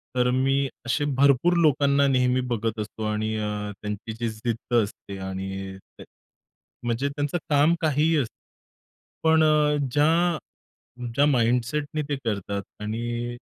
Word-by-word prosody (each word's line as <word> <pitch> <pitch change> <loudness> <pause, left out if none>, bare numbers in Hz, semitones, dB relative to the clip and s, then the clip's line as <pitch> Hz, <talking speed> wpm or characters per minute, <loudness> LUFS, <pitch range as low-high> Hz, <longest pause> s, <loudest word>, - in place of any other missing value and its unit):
तर 125 0 +3
मी 135 +2 +2 0.2
असे 145 +4 0
भरपूर 140 +5 +4
लोकांना 140 -3 +4
नेहमी 125 -1 +2
बघत 110 0 -2
असतो 110 +1 -5
आणि 110 +1 -1
अ, 105 -1 -3
त्यांची 105 +1 -5
जी 115 -1 -1
जिद्द 115 +2 -4
असते 100 -1 -8
आणि 95 0 -5 0.2
ते - - -8 0.8
म्हणजे 120 +4 0
त्यांचं 145 +4 -2
काम 150 +3 +4
काहीही 155 +1 +2
असतं. 125 -6 -1 0.9
पण 160 0 +5
अ, 150 -1 +4 0.2
ज्या 165 +3 +3 0.8
ज्या 145 +1 +4
माइंडसेटनी 135 +4 +1
ते 145 - +1
करतात 100 -2 -2 0.2
आणि 120 +2 -3
125 Hz, 130 wpm, -25 LUFS, 110-145 Hz, 0.9 s, पण